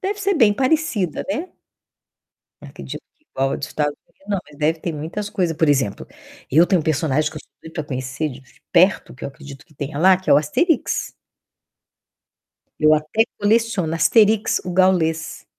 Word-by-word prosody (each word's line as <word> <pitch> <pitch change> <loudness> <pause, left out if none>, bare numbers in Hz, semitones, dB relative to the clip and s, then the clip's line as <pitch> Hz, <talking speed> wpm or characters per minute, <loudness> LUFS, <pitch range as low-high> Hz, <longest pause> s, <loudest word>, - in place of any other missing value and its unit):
Deve 405 +2 -3
ser 400 -1 +1
bem 225 -9 +5
parecida, 255 - 0
né. 330 +5 -3 1.1
Acredito - - -8 0.2
que 305 - -39
igual 135 0 0
a - - -1
dos 140 - -6
Estados 145 -1 -1
Unidos, 195 - -29
não, 200 - 0
mas 145 - -16
deve 155 +2 +1
ter 170 - -3
muitas 165 +8 -5
coisas. 175 -6 -1
Por 160 -1 +2
exemplo, 130 -8 0 0.4
eu 160 +6 +5
tenho 185 -2 +2
um - - -8
personagem 155 0 0
que 155 - -13
eu - - -6 0.2
sempre 160 - -9
quis - - -15
conhecer 130 +3 -3
de 130 +1 -11 0.3
perto, 185 +3 +3
que 130 - -10
eu - - -2
acredito 140 0 -12
que 155 - -24
tenha 140 +1 -5
lá, 185 +3 +6
que 185 - -5
é - - +8
o - - +7
Asterix. 275 - 0 1.7
Eu 155 0 +5
até 155 +9 +1 0.2
coleciono 205 -6 +1
Asterix, 210 +6 +3
o 180 - -4
Gaulês. 170 -3 +1
165 Hz, 180 wpm, -21 LUFS, 150-205 Hz, 1.7 s, é